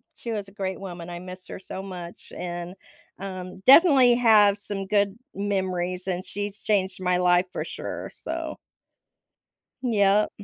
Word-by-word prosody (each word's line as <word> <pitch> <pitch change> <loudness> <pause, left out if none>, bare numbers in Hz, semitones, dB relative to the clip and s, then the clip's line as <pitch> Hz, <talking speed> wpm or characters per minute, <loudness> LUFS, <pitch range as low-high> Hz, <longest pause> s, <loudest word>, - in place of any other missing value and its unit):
she 235 - -6
was 205 -3 -3
a - - -14
great 190 -2 -4
woman, 175 -3 -7
I 175 0 -6
miss 185 +1 -10
her - - -7
so 190 0 -7
much 180 -3 -9
and, 175 0 -5 0.4
um, 185 -1 -7
definitely 270 -4 +8
have 215 -4 +5
some 200 -1 -4
good 205 0 +1 0.2
memories, 185 -2 -2
and 185 -1 -1
she's 205 0 -5
changed 190 -3 0
my 180 -1 +2
life 180 0 +4
for - - -2
sure. - - -6
So - - -5 1.3
Yep. 210 -3 +3
195 Hz, 150 wpm, -25 LUFS, 180-205 Hz, 1.3 s, definitely